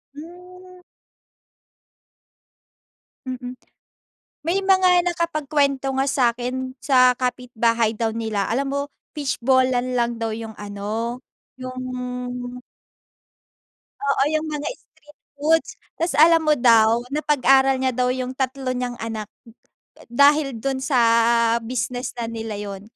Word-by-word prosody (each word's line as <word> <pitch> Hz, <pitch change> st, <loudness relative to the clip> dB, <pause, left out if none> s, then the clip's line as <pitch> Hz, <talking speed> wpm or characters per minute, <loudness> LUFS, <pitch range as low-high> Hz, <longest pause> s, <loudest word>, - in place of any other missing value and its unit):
Hmm. 360 Hz, +3 st, -13 dB, 2.5 s
Mm, 250 Hz, 0 st, -6 dB, 0.9 s
may 385 Hz, +4 st, +1 dB
mga 370 Hz, -2 st, +4 dB
nakapag-kwento 300 Hz, -6 st, 0 dB
nga 270 Hz, -, +2 dB
sa'kin, 255 Hz, 0 st, -1 dB
sa 255 Hz, -2 st, +5 dB
kapitbahay 235 Hz, -3 st, 0 dB
daw 225 Hz, 0 st, -2 dB
nila, 220 Hz, -3 st, -2 dB
alam 270 Hz, +4 st, -1 dB
mo 280 Hz, 0 st, -2 dB, 0.3 s
fishball-an 255 Hz, -2 st, +1 dB
lang 235 Hz, 0 st, 0 dB
daw 225 Hz, -1 st, -3 dB
yung 220 Hz, 0 st, -6 dB
ano, 210 Hz, +4 st, -4 dB, 0.4 s
yung 255 Hz, 0 st, -7 dB, 2.3 s
Oo, 275 Hz, -1 st, +1 dB
yung 310 Hz, 0 st, 0 dB
mga 295 Hz, 0 st, -4 dB
street 295 Hz, 0 st, -24 dB, 0.2 s
foods. 320 Hz, +2 st, +2 dB, 0.3 s
Tas 335 Hz, +1 st, 0 dB
alam 325 Hz, +1 st, +6 dB
mo 305 Hz, -1 st, +4 dB
daw, 230 Hz, -1 st, +4 dB
napag-aral 270 Hz, -3 st, +3 dB
niya 260 Hz, -1 st, 0 dB
daw 250 Hz, 0 st, +1 dB
yung 255 Hz, 0 st, -4 dB
3 265 Hz, -1 st, -2 dB
niyang 245 Hz, -1 st, -3 dB
anak, 220 Hz, -2 st, -5 dB, 0.8 s
dahil 280 Hz, +1 st, +4 dB
dun 265 Hz, +3 st, -2 dB
sa 265 Hz, -2 st, 0 dB, 0.7 s
business 245 Hz, +2 st, -3 dB
na 235 Hz, -, -2 dB
nila 225 Hz, -1 st, -5 dB
yun. 200 Hz, -1 st, -6 dB
255 Hz, 110 wpm, -22 LUFS, 235-290 Hz, 2.5 s, alam